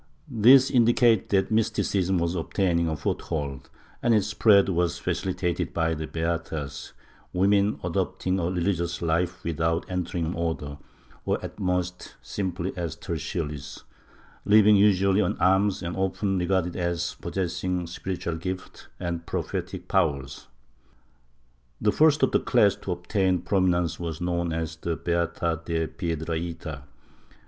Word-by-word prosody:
^ - - -34 0.2
This 130 +2 +6
indicates 120 -3 +4
that 95 0 +1
mysticism 95 -4 +1
was 85 0 0
obtaining 85 -1 0
a 80 -1 -2
foothold 70 -3 -3 0.3
and 120 -1 +3
its 105 -3 +2
spread 105 -1 +4
was 85 -3 0
facilitated 90 -3 -2
by 80 -1 +1
the 80 0 -4
beatas, 80 -3 -4 0.4
women 100 +3 +2
adopting 90 +1 -1
a 85 - -1
religious 85 -2 -1
life 85 +2 0
with 85 -1 -3
out 80 +2 +1
entering 90 -2 -2
an 85 - -2
Order, 80 -4 -3 0.4
or - - 0
at - - -9
most 90 -2 -2
simply 95 -2 -3
as 85 -3 -3
Tertiaries, 75 -3 -5 0.6
living 105 0 +6
usually 100 0 +4
on - - 0
alms 95 +1 +2
and 85 0 -3
often 95 0 0
regarded 90 -1 0
as 85 -1 -2
possessing 90 -1 -2
spiritual 85 -1 -4
gifts 90 +2 -6
and 85 -1 -4
prophetic - - -4
powers. 70 -1 -1 1.3
The 105 - +2
first 155 +1 +4
of 135 - +4
the - - +3
class 105 -5 +3
to 90 - -3
ol^tain 95 0 0
prominence 90 -4 +1
was 85 -2 -4
known 85 -1 -1
as 80 0 -3
the 85 0 -2
Beata 85 -1 -1
de 80 -1 -1
Piedrahita. 80 -3 -4
90 Hz, 135 wpm, -26 LUFS, 85-95 Hz, 1.3 s, This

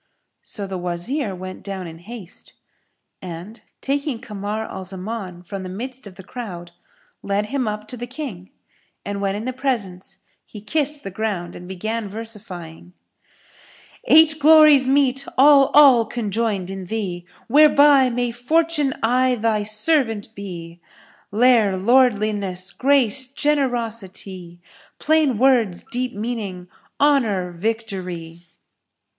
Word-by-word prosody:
So 205 - -6
the 190 -1 -5
Wazir, 185 - -3
went 185 +1 -8
down 195 -2 -6
in 165 -1 -10
haste, 205 -1 -11 0.7
and 180 +5 -9 0.2
taking 280 -2 -2
Kamar 210 0 -5
al 190 - -7
Zaman 190 -1 -6
from 195 +2 -6
the 185 - -7
midst 250 +5 -7
of 190 - -13
the 190 - -12
crowd 180 -6 -8 0.5
led 200 +1 -1
him 270 -4 -1
up 210 0 -4
to 250 - -6
the 245 +1 -6
King; 245 - -7 0.6
and 200 0 -4
when 195 0 -1
in 215 +2 -5
the 255 - -3
presence 200 -8 -3 0.3
he 210 - -11
kissed 295 +6 -1
the 195 - -6
ground 190 -4 -3
and 180 - -10
began 215 +4 -4
versifying, 195 -6 -8 1.1
"Eight 315 0 +5
glories 300 -3 +7
meet, 270 0 +2
all, 275 0 +7
all 265 -6 +7
conjoined 210 -4 -2
in 195 -1 -6
thee, 180 -4 -4
* - - -29
Whereby 285 -1 +6
may 245 0 -1
Fortune 300 +3 +1
aye 250 +2 +3
thy 220 -2 0
servant 220 0 +1
be: 175 -4 -9 0.5
Lere, 220 -3 +3
lordliness, 205 -5 +2
grace, 265 -2 +3
generosity; 230 - -3 0.2
* - - -27
Plain 305 -6 +2
words, 235 -7 +2
deep 250 -1 -3
meaning, 205 -5 -5 0.3
honour, 225 -11 +2
victory!" 180 -4 -4
220 Hz, 130 wpm, -21 LUFS, 190-255 Hz, 1.1 s, glories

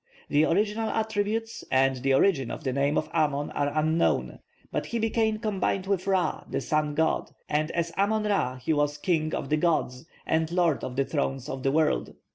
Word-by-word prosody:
The 150 +2 +4
original 210 +6 +1
attributes 220 +1 -2
and 135 0 +3
the 135 +1 +2
origin 135 -6 +3
of - - -6
the 130 -3 -1
name 140 +2 +1
of 155 - 0
Amon 145 -3 0
are 145 0 -1
unknown; 160 +2 +1 0.3
but - - -2
he 235 - -2
became 220 -1 +1
combined 195 -3 -1
with 195 -1 -1
Ra, 190 -2 +1
the - - -1
sun 150 +3 0
god, 160 +1 +1 0.2
and 155 +1 0
as 170 0 -2
Amon 215 +2 +2
Ra 200 -12 0
he 130 +5 -1
was 145 0 +1
'king 155 -1 0
of 135 - -4
the 155 - +2
gods,' 155 -4 0 0.2
and 160 0 0
'lord 175 -4 +1
of 125 - -4
the 135 0 +1
thrones 135 -2 -2
of 130 - -5
the 135 - +1
world.' 155 +1 +1
155 Hz, 195 wpm, -27 LUFS, 140-195 Hz, 0.3 s, The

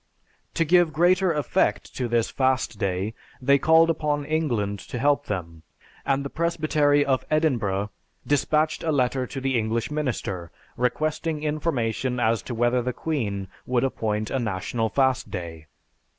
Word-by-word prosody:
To 165 - +2
give 175 -1 +4
greater 180 +3 +3
effect 150 -3 0
to 125 - -1
this 115 -1 +1
fast 130 -5 0
day, 95 +3 -1 0.3
they 140 +1 +4
called 160 +3 +5
upon 150 -2 -1
England 120 -11 -1
to 125 - -7
help 145 +3 +2
them, 85 -5 -5 0.5
and 140 0 +1
the - - -3
Presbytery 155 -3 +2
of 135 -2 +1
Edinburgh 115 -10 +1 0.3
dispatched 155 +2 +1
a 160 - 0
letter 130 -2 +1
to 135 - -5
the 130 -2 +1
English 115 +5 -1
minister, 115 - -3 0.3
requesting 155 +5 -1
information 130 -5 -1
as 115 -2 +2
to 120 - -6
whether 120 +2 +2
the 125 +1 -2
queen 105 -13 -2 0.2
would 125 0 +1
appoint 110 -5 -1
a 135 - 0
national 110 +1 -2
fast 130 0 +1
day. 80 -4 -7
130 Hz, 150 wpm, -25 LUFS, 110-150 Hz, 0.5 s, called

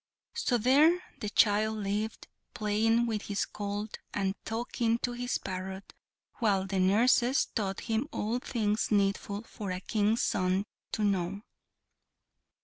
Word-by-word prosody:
So 245 - +1
there 290 +9 +5 0.2
the 210 - -3
child 215 +1 +3
lived, 210 +2 -3 0.3
playing 220 +3 +2
with 220 -3 -1
his 205 -1 -1
colt, 205 +1 -5 0.2
and 195 -1 0
talking 230 0 0
to 245 - +1
his 245 +1 -2
parrot, 190 +1 -6 0.5
while 200 -5 +2
the 195 0 -1
nurses 240 +7 +4
taught 195 -4 -2
him 225 +4 -1
all 225 +4 -1
things 220 -4 0
needful 200 0 0
for 210 -3 -7
a 185 0 -2
King's 215 +3 +1
son 185 +2 +1 0.3
to 215 - 0
know. 195 -1 0
210 Hz, 135 wpm, -30 LUFS, 200-230 Hz, 0.5 s, there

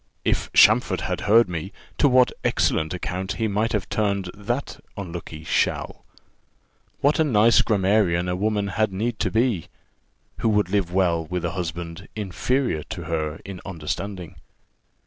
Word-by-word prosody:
If - - 0
Champfort - - +5
had - - -3
heard 115 +1 +6
me, 90 +2 -5 0.3
to 145 - +5
what 125 -1 +5
excellent 80 0 +1
account 90 +1 -3
he 115 -1 -1
might 105 +3 0
have 105 -4 -1
turned 100 -4 -1
that 120 +7 -4 0.2
unlucky 85 -4 -7
shall. - - -1 1.0
What 145 +3 +3
a - - +5
nice 115 -5 +5
grammarian 95 -4 +2
a 90 - -1
woman 105 +1 0
had 110 +2 0
need 110 +4 -2
to 100 - +1
be, 110 -4 +1 0.7
who 115 - +1
would 105 -4 +2
live 100 -4 +1
well 85 -3 +1
with 90 0 -3
a 85 - -1
husband 85 +1 -5
inferior 110 - -1
to 85 - -7
her 80 -2 -3
in 95 -2 -8
understanding! 90 +1 -5
95 Hz, 150 wpm, -24 LUFS, 85-110 Hz, 1.0 s, heard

